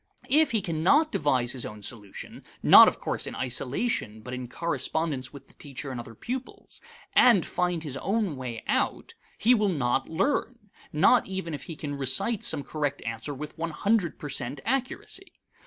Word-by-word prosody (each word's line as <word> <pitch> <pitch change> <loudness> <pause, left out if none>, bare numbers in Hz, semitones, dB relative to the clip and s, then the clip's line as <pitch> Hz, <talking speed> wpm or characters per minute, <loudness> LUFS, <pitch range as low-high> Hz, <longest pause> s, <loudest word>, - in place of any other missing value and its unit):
If 310 +2 +5
he 220 -4 +1
cannot 185 - +3
devise 130 -5 +1
his 130 - -3
own 105 -1 -8
solution 105 -3 -7 0.2
(not - - +10
of - - +1
course - - -3
in - - -5
isolation, 125 - -2
but 125 +3 -8
in 125 -1 -5
correspondence 140 -1 -2
with 140 -1 -12
the - - -19
teacher 140 -1 -7
and 125 - -5
other 115 -1 -9
pupils) 255 - -7 0.3
and 230 -9 +6
find 175 -2 -1
his 140 -4 -4
own 200 -1 -1
way 125 -4 -6
out - - -1 0.2
he 240 +3 +5
will 210 -4 +2
not 135 -5 0
learn, 210 - -1 0.2
not 160 +11 +4
even 190 -4 -4
if 145 - -6
he 165 - -7
can 145 -1 -5
recite 140 - +1
some 145 -3 +1
correct 145 -2 -3
answer 115 +5 -4
with 150 +3 -7
one 165 0 -1
hundred 200 +2 0
per 145 - -7
cent 135 +1 -2
accuracy. 270 +9 -3
150 Hz, 175 wpm, -27 LUFS, 130-200 Hz, 0.3 s, not